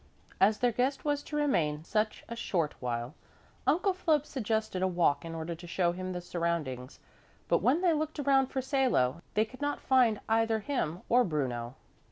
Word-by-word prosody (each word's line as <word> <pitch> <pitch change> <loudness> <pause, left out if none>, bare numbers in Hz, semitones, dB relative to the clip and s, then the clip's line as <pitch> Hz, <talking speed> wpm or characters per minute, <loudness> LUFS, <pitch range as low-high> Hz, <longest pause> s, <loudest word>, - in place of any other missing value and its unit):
As 210 +2 +4
their 245 +1 +2
guest 260 +6 -1
was 290 -1 +1
to 295 - -7
remain 160 - +1
such 215 +5 -1
a 235 - -6
short 170 -9 -1
while, 120 -1 -3 0.5
Uncle 370 +4 +3
Philip 315 -5 +1
suggested 220 -7 -2
a 190 - +3
walk 170 -6 +2
in 165 0 -6
order 165 +1 -4
to 175 +1 -10
show 170 0 +1
him 185 +1 -5
the 180 -1 -4
surroundings, 165 -8 -3 0.5
but - - +2
when 290 +7 +3
they 355 -3 +4
looked 310 +1 -2
around 275 -2 +3
for 265 0 -3
Salo, 245 - +1
they 215 +1 +3
could 255 +5 -14
not 290 0 -1
find 245 -5 +3
either 225 0 +2
him 205 - -2
or 245 +1 +5
Bruno. 125 - -2
215 Hz, 185 wpm, -30 LUFS, 165-270 Hz, 0.5 s, or